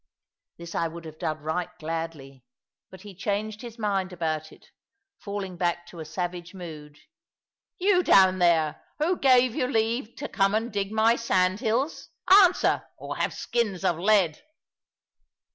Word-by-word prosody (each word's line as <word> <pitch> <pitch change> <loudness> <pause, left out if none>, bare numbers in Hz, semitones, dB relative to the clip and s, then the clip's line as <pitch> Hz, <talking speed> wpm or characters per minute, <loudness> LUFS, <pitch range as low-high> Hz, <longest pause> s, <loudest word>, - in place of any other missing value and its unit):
This 170 0 -9
I 165 - 0
would 165 +1 -9
have 155 0 -10
done 155 -3 -3
right 165 +3 -2
gladly, 155 -5 -6 0.5
but 190 - -13
he 205 -1 -11
changed 205 +3 -3
his 235 -1 -9
mind 195 -4 -1
about 160 -3 -3
it, - - -19 0.5
falling 200 -3 -5
back 175 0 -1
to 170 - -11
a 160 - -6
savage 175 +2 -5
mood. 155 -5 -9 0.8
"You 370 0 +3
down 190 - +5
there, 165 -4 +2
who 335 +4 0
gave 255 -3 +4
you 255 -2 0
leave 230 -1 -1
to 290 - -5
come 195 0 +1
and 225 +1 -2
dig 200 0 -2
my 220 +2 +4
sandhills? 220 - 0 0.2
Answer, 375 -2 +5
or - - -6
have - - 0
skins 210 -6 -2
of 170 -3 +1
lead." 190 -5 +2
190 Hz, 150 wpm, -26 LUFS, 165-225 Hz, 0.8 s, down